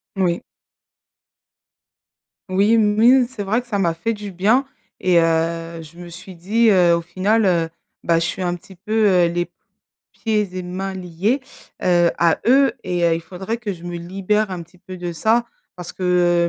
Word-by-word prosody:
Moui. 180 -3 0 2.1
Oui. 200 +5 +3
Moui, 225 +4 +4
c'est 230 -5 -6
vrai 220 +5 0
que 245 - -22
ça 205 -4 -2
m'a 170 -3 +1
fait 175 +8 -2
du 205 -2 -7
bien 215 +9 +2 0.3
et 180 -2 +3
heu, 165 0 0
je 165 +2 -14
me 175 -1 -9
suis 185 +2 -11
dit: 220 +7 +2
«heu, 180 -3 +5
au 170 - -1
final, 195 +6 +1
heu, 170 -3 +2 0.3
bah 165 -1 +2
je 165 - -1
suis 175 +3 -4
un 175 -1 -1
petit 185 +2 -14
peu, 215 +4 0
heu, 180 -3 +4
les 175 +1 -1
p 175 - -31 0.6
pieds 210 -4 -2
et 185 - -2
mains 190 +2 -4
liés, 185 +7 -1 0.4
heu, 175 -1 +3
à 170 -1 +3
eux 265 -1 +5
et 180 -1 -1
heu, 165 -1 +3
il 165 - -4
faudrait 190 +6 -5
que 225 -4 -4
je 170 - -13
me 175 0 -5
libère 195 +4 -1
un 180 -2 -4
petit 180 +3 -23
peu 185 +1 -10
de 175 -1 -5
ça 225 +7 +2 0.3
parce 180 -1 -8
que, 175 -2 +2
185 Hz, 190 wpm, -20 LUFS, 170-210 Hz, 2.1 s, heu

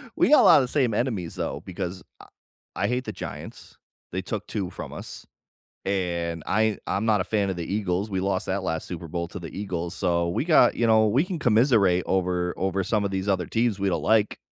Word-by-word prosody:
we - - +3
got 300 - +7
a - - +4
lot - - +8
of 125 - -1
the - - -9
same 130 -7 +2
enemies, 105 -8 -2
though, - - -3
because 90 0 -5 0.2
I - - -14 0.5
I 100 - -1
hate 125 +1 -1
the - - -5
Giants. - - -9 0.4
They 95 - -1
took 105 +2 -5
2 95 -5 -3
from - - -8
us, - - -9 0.6
and 85 -4 -2
I 110 0 +1
I'm 105 +3 -1
not 105 -3 +3
a - - 0
fan 100 -3 0
of 95 - -2
the 85 +1 -5
Eagles, 100 0 -1
we 95 -1 -1
lost 95 +1 -1
that 95 0 -1
last 80 -2 -3
Super 85 -2 -6
Bowl 85 +1 -3
to 95 - -7
the 85 - -7
Eagles, 90 -3 -4
so 85 -2 0
we 130 - -1
got 155 -7 +5
you 115 - +1
know, 110 -1 +5
we 130 +9 +3
can 180 -3 -4
commiserate 110 - +3
over 90 -1 0
over 95 0 0
some 105 +1 0
of 100 - -2
these 95 +1 -2
other 95 -3 +1
teams 115 -3 0
we 100 0 +1
don't - - -1
like. 110 -1 +2
95 Hz, 230 wpm, -25 LUFS, 90-110 Hz, 0.6 s, lot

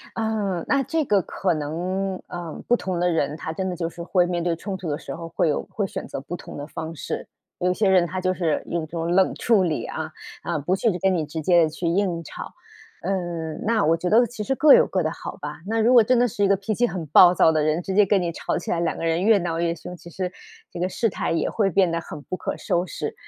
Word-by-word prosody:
呃， 210 -5 -1
那 275 -1 +2
这 320 +3 0
个 205 -7 +2
可 185 +1 -1
能 180 +5 -3
呃， 175 -3 -6 0.2
不 240 - +5
同 185 -5 -3
的 180 - +3
人， 150 -2 0
他 160 - -5
真 190 +3 -3
的 180 - -3
就 165 -1 -2
是 170 0 -10
会 180 +1 +2
面 175 -1 -2
对 170 -1 0
冲 190 +3 -5
突 175 -3 -5
的 145 - -1
时 135 - -7
候， 165 +3 -7
会 165 -1 0
有 145 - -1
会 205 - -2
选 - - -6
择 135 - -5
不 175 +5 -6
同 - - -10
的 145 - -6
方 160 +1 -6
式。 - - -5 0.3
有 180 0 +2
些 200 +1 +2
人 180 -2 +4
他 185 +1 -4
就 185 0 +1
是 165 -4 -1
用 165 -2 -2
这 - - -33
种 170 0 -2
冷 190 +1 +3
处 225 -5 +3
理 165 -4 -1
啊， 155 0 -4 0.3
啊， 170 -3 -1
不 150 +6 -1
去 225 +4 +2
跟 190 +2 +2
你 165 -4 0
直 155 +2 -5
接 170 0 +4
去 155 +3 -6
硬 170 -1 0
吵。 - - -8 0.5
嗯， 175 -4 -3
那 220 -1 +2
我 165 +2 +3
觉 180 +1 -2
得 235 +3 +5
其 240 -1 -7
实 270 +6 -1
各 300 +1 +7
有 - - +6
各 185 -2 0
的 155 - -1
好 - - -7
吧， 150 +1 -6
那 225 +1 +1
如 230 +3 +4
果 245 -2 +8
真 250 +3 +3
的 245 0 +3
是 205 -1 0
一 - - +3
个 200 - +4
脾 200 +3 -3
气 240 +3 +2
很 175 -3 -5
暴 175 +4 +8
躁 160 - +5
的 155 -1 +1
人， 155 +3 +1
直 190 - -3
接 205 +1 +5
跟 195 -1 +2
你 170 - -1
吵 - - -2
起 - - -4
来， 170 - +1
两 170 -1 0
个 - - -5
人 165 +1 +1
越 215 +1 +5
闹 170 -2 -2
越 170 0 0
凶， 175 +2 -9
其 170 - -13
实 180 +1 -4 0.4
这 - - -7
个 180 - +1
事 225 +4 0
态 - - -3
也 165 - 0
会 205 -3 +1
变 185 -1 +3
得 165 - 0
很 155 -3 -9
不 185 - -5
可 - - -3
收 175 +1 0
拾。 - - -4
175 Hz, 295 characters per minute, -24 LUFS, 165-195 Hz, 0.5 s, 果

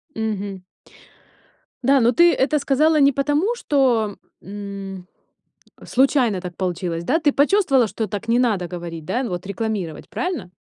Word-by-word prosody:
Мгм. 205 -4 -3 1.2
Да, 275 +2 +4
но 235 +1 +4
ты 345 +6 +5
это 295 +3 +1
сказала 300 +3 +2
не 280 0 +5
потому, 295 - 0
что, 245 - +1 0.2
м, 195 -2 -8 0.8
случайно 255 -6 +2
так 180 -1 -7
получилось, 175 -2 -3
да? 280 - +1
Ты 300 -3 +2
почувствовала, 285 - +3
что 220 +1 -4
так 205 +3 -6
не 235 +1 +3
надо 210 -8 +1
говорить, 170 -3 -7
да, 240 +10 -1
вот 180 -4 -4
рекламировать, 200 -5 -4
правильно? 355 - -4
225 Hz, 140 wpm, -21 LUFS, 190-275 Hz, 1.2 s, ты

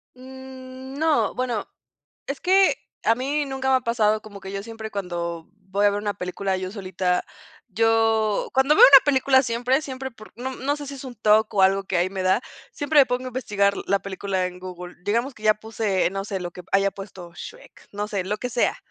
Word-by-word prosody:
Mm, 260 0 -10
no. 315 -1 +2
Bueno, 245 -4 -2 0.6
es 275 - -4
que 385 +1 +4 0.3
a 225 - +4
mí 285 +4 -1
nunca 265 -1 -2
me 260 - +5
ha 255 - -5
pasado, 215 -3 +1
como 205 -2 -11
que 190 0 -8
yo 195 0 -4
siempre 220 -1 -8
cuando 170 -4 -4
voy 200 +1 -1
a 205 - +6
ver 205 - -2
una 205 -1 -2
película 190 +1 -2
yo 185 0 -5
solita, 185 -3 -1 0.4
yo 225 0 +2
cuando 265 +3 +4
veo - - +7
una 275 -1 +10
película 265 -2 +4
siempre, 245 +4 +1
siempre 265 -2 -6
por 215 -2 -15
no 260 +1 -4
no 280 +3 -1
sé 290 - -7
si 280 - -6
es 270 - -9
un 250 -2 -8
TOC 215 0 +3
o 195 - +4
algo 195 +1 +3
que 185 - -1
ahí 180 +2 +1
me 190 -1 -3
da 190 +5 +3 0.3
siempre 295 +1 +2
me 275 - +7
pongo 250 +1 -1
a - - -4
investigar 205 -5 +1
la 200 - +2
película 190 -1 -2
en 180 0 -10
Google. 180 -1 -9
Digamos 235 +7 0
que 215 - -16
ya 215 0 +5
puse, 215 -4 -1
no 195 0 -4
sé, 200 -2 -3
lo 175 -1 -5
que 180 - -10
haya 195 0 +3
puesto 190 -3 -10
Shrek, - - -12
no 205 +1 -3
sé, 200 -3 -2
lo 210 +2 -2
que 250 - -4
sea, 235 0 +1
215 Hz, 220 wpm, -24 LUFS, 195-260 Hz, 0.6 s, una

